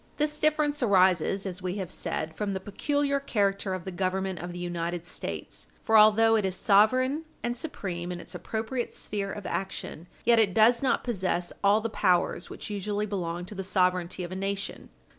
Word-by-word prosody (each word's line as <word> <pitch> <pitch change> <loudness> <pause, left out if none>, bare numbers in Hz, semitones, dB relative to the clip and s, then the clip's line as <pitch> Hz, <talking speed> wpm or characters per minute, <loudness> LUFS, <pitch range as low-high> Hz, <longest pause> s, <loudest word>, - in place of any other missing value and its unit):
This 300 0 0
difference 300 -1 +2
arises, 190 -3 +3
as 185 -1 -4
we 185 0 -2
have 190 -4 -4
said, 160 -2 -4
from 205 -2 -2
the 190 - -2
peculiar 280 +8 0
character 200 -7 0
of 185 - -7
the 190 - -4
Government 190 0 -1
of 175 +1 -5
the 175 - -7
United 175 -1 -3
States. 180 - -5 0.2
For 225 - +2
although 220 +1 +7
it 215 - +2
is 190 -1 0
sovereign 255 - +3 0.2
and 240 +1 -1
supreme 185 - -5
in 175 - -5
its - - -7
appropriate 230 +3 -3
sphere 200 -1 -4
of 205 - -7
action, 190 -3 -4 0.2
yet 235 -1 +5
it 200 -5 +3
does 230 +2 +5
not 265 - +1
possess 185 -6 -1
all 205 +2 +5
the 230 - -2
powers 180 -3 +1
which - - -7
usually 205 +1 -2
belong 175 -4 -3
to 200 - -9
the 195 -1 -4
sovereignty 185 -1 +1
of 175 - -6
a - - -4
nation. 195 +1 -4
195 Hz, 190 wpm, -28 LUFS, 180-225 Hz, 0.2 s, although